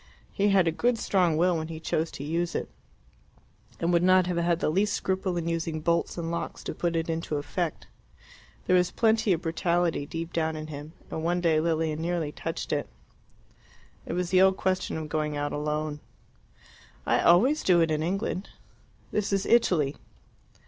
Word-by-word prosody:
He 205 0 +2
had 190 -3 +4
a - - +3
good 240 +8 +1
strong 180 -7 +2
will 175 +1 +3
when 160 0 -3
he 160 -1 -7
chose 160 0 -1
to 140 - -6
use 170 +3 -2
it, - - -3 1.1
and 170 +1 +1
would 170 - +4
not 185 0 +5
have 180 -1 -2
had 170 0 +1
the 155 - +1
least 205 +4 +1
scruple 190 -1 -1
in 170 -1 -2
using 165 -1 -2
bolts 170 +3 0
and 165 -1 -3
locks 170 - -4
to - - -4
put 170 -1 -1
it 165 0 -1
into 165 -2 -2
effect. 155 +3 -3 0.8
There 185 - +3
was 180 0 +3
plenty 220 +1 +2
of 175 -1 0
brutality 170 -2 0
deep 165 +2 -5
down 160 -1 0
in 155 0 -5
him, 145 +2 -8 0.2
and 160 - -4
one 175 +2 +1
day 165 -3 +3
Lilia 160 -1 0
nearly 165 -2 -2
touched - - -4
it. - - -2 1.2
It - - -3
was 180 0 -2
the 185 0 +5
old 190 0 +5
question 185 -3 -1
of 155 -1 -5
going 150 -1 -2
out 145 0 -2
alone. 150 0 -2 1.1
"I - - +2
always 245 - +4
do 180 -2 +4
it 165 -1 +2
in 155 0 0
England." 190 +3 -2 0.6
"This 210 -1 -1
is 195 0 +1
Italy." 170 -12 +3
170 Hz, 185 wpm, -27 LUFS, 160-185 Hz, 1.2 s, not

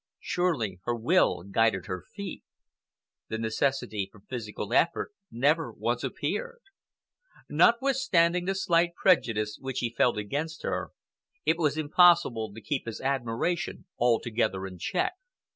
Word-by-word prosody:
Surely 130 - -1
her 120 - 0
will 120 - +2
guided 100 -1 +1
her 90 -1 -4
feet! 200 -1 -6 0.8
The 110 - -3
necessity 110 -2 -1
for 105 - -17
physical 105 -3 -6
effort 170 +4 +2 0.2
never 150 +7 +1
once - - -2
appeared. 485 -1 -3 0.9
Notwithstanding 235 -9 +3
the 195 +1 0
slight 170 -2 +2
prejudice 115 - +2
which 130 -1 -4
he 120 -2 0
had 115 - -24
felt 120 - +3
against 145 +10 -3
her, - - -2 0.6
it 165 +1 +2
was 150 -2 +1
impossible 155 - +4
to 110 +2 -11
keep 130 +3 -3
his 115 - -5
admiration 135 +7 -2
altogether 115 -4 +1
in 90 -2 -8
check. 370 - 0
130 Hz, 130 wpm, -28 LUFS, 110-175 Hz, 0.9 s, impossible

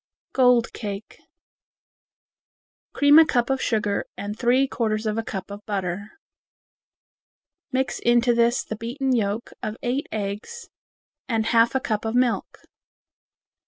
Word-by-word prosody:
Gold 250 -3 +4
Cake 205 -1 -7 1.7
Cream 285 +2 +6
a 325 - +8
cup 245 -2 +1
of 265 - 0
sugar 210 -3 0
and 205 +1 -5
three 255 +3 +2
fourths 220 -4 -1
of 215 -1 0
a 225 - 0
cup 195 -2 -6
of 205 +1 -8
butter. 200 0 -3 1.6
Mix 265 0 -1
into 240 0 +3
this 235 +1 +2
the 220 - -5
beaten 255 +4 -1
yolks 215 0 -2
of 215 +1 -4
eight 255 +4 -1
eggs 215 - -5 0.6
and 225 -2 +1
half 230 +2 +3
a - - +3
cup 215 -4 -2
of 225 +1 -2
milk. 250 -2 0
230 Hz, 130 wpm, -24 LUFS, 210-250 Hz, 1.7 s, a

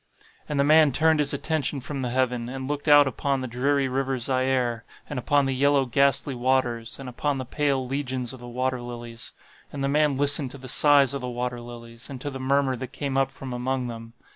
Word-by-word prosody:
"And 150 -2 -1
the - - +5
man 155 0 +5
turned 160 +3 +3
his 145 -1 +1
attention 150 0 -1
from 140 +1 -5
the 125 - -2
heaven, 125 -1 -1
and 130 0 -5
looked 145 +1 -4
out 145 -1 +7
upon 135 +1 -1
the 130 - -4
dreary 135 +3 +1
river 135 0 -1
Zaire, 130 -2 0 0.2
and 145 - -4
upon 145 +2 +2
the 135 - 0
yellow 140 +1 +3
ghastly 140 +2 +2
waters, 120 -2 0
and 135 - -8
upon 140 +3 -2
the 130 - -4
pale 135 0 0
legions 130 -2 -3
of 130 - -10
the 120 - -10
water 125 +1 -2
lilies. 120 -1 -7 0.4
And 140 -1 -4
the - - +1
man 145 -1 +2
listened 145 -1 +3
to 140 - -9
the 130 -1 -10
sighs 140 -1 +5
of 140 - -4
the 125 - -4
water 120 0 -3
lilies, 115 0 -10
and 135 -2 -7
to 145 +3 -5
the 135 - -6
murmur 135 0 +1
that 130 +1 -7
came 140 -2 -3
up 135 0 +2
from 135 -1 -8
among 125 0 -2
them. 115 0 -9
130 Hz, 220 wpm, -25 LUFS, 125-140 Hz, 0.4 s, out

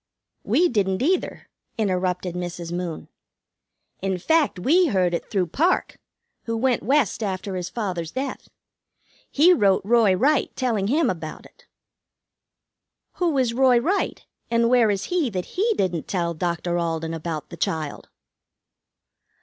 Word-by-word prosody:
"We 355 - +3
didn't, 200 - 0
either," 365 +5 -1 0.3
interrupted 185 -3 -1
Mrs. 175 -1 -5
Moon. 175 -2 -4 0.9
"In 190 -1 -1
fact, 315 - +2
we 330 - +3
heard 185 - +1
it 170 - -3
through 190 -4 +1
Parke, 325 - 0 0.5
who 230 -1 -2
went 250 +1 +1
West 270 -4 +1
after 195 -1 -3
his 180 0 -4
father's 185 -8 -3
death. 265 0 -5 0.8
He 335 +6 +5
wrote 195 - +3
Roy 225 -3 +4
Wright, 280 +9 +2
telling 225 -7 0
him 290 +5 +2
about 165 -6 -5
it." - - -20 1.5
"Who 340 -5 +1
is 250 -3 +1
Roy 255 0 +4
Wright, 350 +12 -1 0.2
and 235 0 +2
where 240 -3 +5
is 200 -1 -1
he, 345 -3 0
that 185 -4 -3
he 430 +5 +1
didn't 175 -4 -1
tell 170 -3 -1
Dr. 175 +1 -2
Alden 165 -1 -2
about 160 -2 -5
the 170 - -9
child?" 155 -3 -3
200 Hz, 140 wpm, -23 LUFS, 175-260 Hz, 1.5 s, He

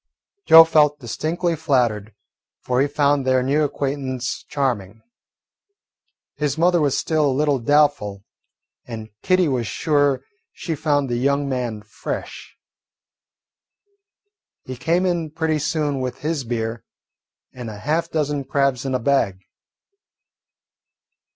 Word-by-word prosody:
Joe 165 0 +10
felt 150 -2 +3
distinctly 165 - -2
flattered, 120 -9 0 0.5
for 125 +1 +1
he 140 - +2
found 145 -1 +1
their 130 -1 +2
new 145 +4 +1
acquaintance 135 -3 -3
charming. 115 -8 -2 1.3
His 150 -1 -1
mother 175 +1 +3
was 145 -3 +1
still 155 -2 +1
a - - +2
little 145 0 +1
doubtful, 130 -7 +1 0.6
and 110 -2 -8
Kitty 185 -2 +2
was 125 -5 -1
sure 145 -1 +1 0.3
she 165 - -4
found 145 -2 0
the 120 -1 -2
young 140 +3 +1
man 120 -5 -3
"fresh." 110 - -7 2.1
He 130 - -7
came 165 +8 0
in 170 -3 -1
pretty 160 0 -1
soon 150 -2 -1
with 125 -1 -4
his 150 -3 -2
beer, 115 -1 -3 0.7
and 125 -3 -7
a 105 - -8
half 160 +9 -1
dozen 150 -3 -1
crabs 135 -1 0
in 130 -1 -1
a - - +1
bag. 115 -8 +1
140 Hz, 125 wpm, -21 LUFS, 125-150 Hz, 2.1 s, Joe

